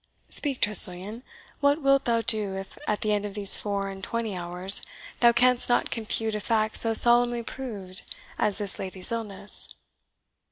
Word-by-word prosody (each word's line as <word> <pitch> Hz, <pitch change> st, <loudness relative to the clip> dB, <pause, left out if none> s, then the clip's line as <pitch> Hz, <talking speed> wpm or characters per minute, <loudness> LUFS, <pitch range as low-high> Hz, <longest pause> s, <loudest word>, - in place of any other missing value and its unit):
Speak, 280 Hz, -4 st, +1 dB
Tressilian, 205 Hz, +2 st, +4 dB, 0.4 s
what 285 Hz, +1 st, -1 dB
wilt 275 Hz, 0 st, 0 dB
thou 230 Hz, -1 st, -1 dB
do 215 Hz, -5 st, -3 dB
if, 195 Hz, 0 st, -11 dB
at 210 Hz, -, -4 dB
the 215 Hz, -, -3 dB
end 205 Hz, -1 st, -3 dB
of 205 Hz, -1 st, -9 dB
these 200 Hz, -2 st, +7 dB
four 200 Hz, -1 st, -5 dB
and 195 Hz, -1 st, -11 dB
twenty 230 Hz, -2 st, -6 dB
hours, 180 Hz, +2 st, +1 dB, 0.4 s
thou 235 Hz, -1 st, +3 dB
canst 250 Hz, +1 st, 0 dB
not 245 Hz, -, -2 dB
confute 225 Hz, -1 st, -4 dB
a 210 Hz, -, -5 dB
fact 215 Hz, 0 st, -3 dB
so 225 Hz, -1 st, +1 dB
solemnly 240 Hz, 0 st, +4 dB
proved 205 Hz, -8 st, -9 dB, 0.4 s
as 205 Hz, -2 st, -2 dB
this 205 Hz, -2 st, 0 dB
lady's 185 Hz, +1 st, -3 dB
illness?" 210 Hz, -3 st, +1 dB
215 Hz, 165 wpm, -23 LUFS, 195-235 Hz, 0.4 s, these